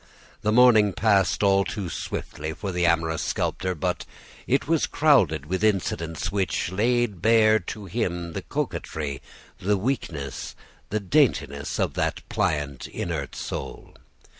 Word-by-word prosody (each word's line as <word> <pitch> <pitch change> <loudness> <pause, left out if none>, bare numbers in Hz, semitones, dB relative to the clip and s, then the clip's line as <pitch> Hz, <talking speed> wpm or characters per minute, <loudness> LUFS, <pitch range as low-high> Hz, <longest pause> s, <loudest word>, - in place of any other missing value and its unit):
The 105 - +1
morning 110 -4 +6
passed 100 -1 +2
all 100 -1 +4
too 100 -1 -4
swiftly 80 -1 -5
for 100 +4 -5
the 90 -1 +1
amorous 80 -1 +1
sculptor, 95 -1 -1
but 75 - -2 0.4
it 135 +2 +1
was 165 -1 +2
crowded 95 - +3
with 95 +5 -2
incidents 90 -5 0
which 95 -3 -1
laid 110 -1 +1
bare 110 0 +5
to 100 +2 -7
him 90 -4 -2
the - - -3
coquetry, 70 -4 -4 0.4
the 100 +2 +1
weakness, 85 - -3 0.3
the 110 - 0
daintiness, 100 - +1
of - - 0
that - - -2
pliant, 75 -4 -1
inert - - -4
soul. - - -6
95 Hz, 135 wpm, -25 LUFS, 80-110 Hz, 0.4 s, morning